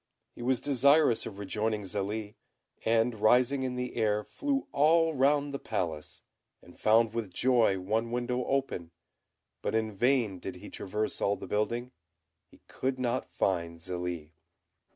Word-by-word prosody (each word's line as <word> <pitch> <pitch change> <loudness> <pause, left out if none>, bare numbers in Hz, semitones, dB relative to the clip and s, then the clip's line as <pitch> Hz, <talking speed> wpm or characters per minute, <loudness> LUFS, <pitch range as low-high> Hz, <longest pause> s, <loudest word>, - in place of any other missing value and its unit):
He - - -11
was 125 0 +1
desirous 140 -1 +3
of 100 - -8
rejoining 105 +2 -2
Zélie; 105 +3 -3 0.5
and 115 +1 +2
rising 125 +5 +4
in 130 -1 -2
the 125 0 -4
air, 105 -2 +1
flew 280 - -2
all 160 +2 +4
round 140 +1 +2
the 140 - -3
palace, 85 -8 -4 0.4
and 85 - -18
found 110 +1 +4
with 115 -5 -3
joy 115 -2 +3
one 110 +5 -1
window 125 +1 -1
open; 135 -11 -1 0.7
but - - -1
in 110 -1 0
vain 115 -2 +1
did 95 0 -6
he 95 +3 -11
traverse 105 +3 -3
all 100 - +2
the - - -8
building 115 +4 -1 0.6
he - - -21
could 130 0 -2
not 125 0 -1
find 85 -3 -1
Zélie. 85 -2 -5
115 Hz, 150 wpm, -30 LUFS, 100-130 Hz, 0.7 s, rising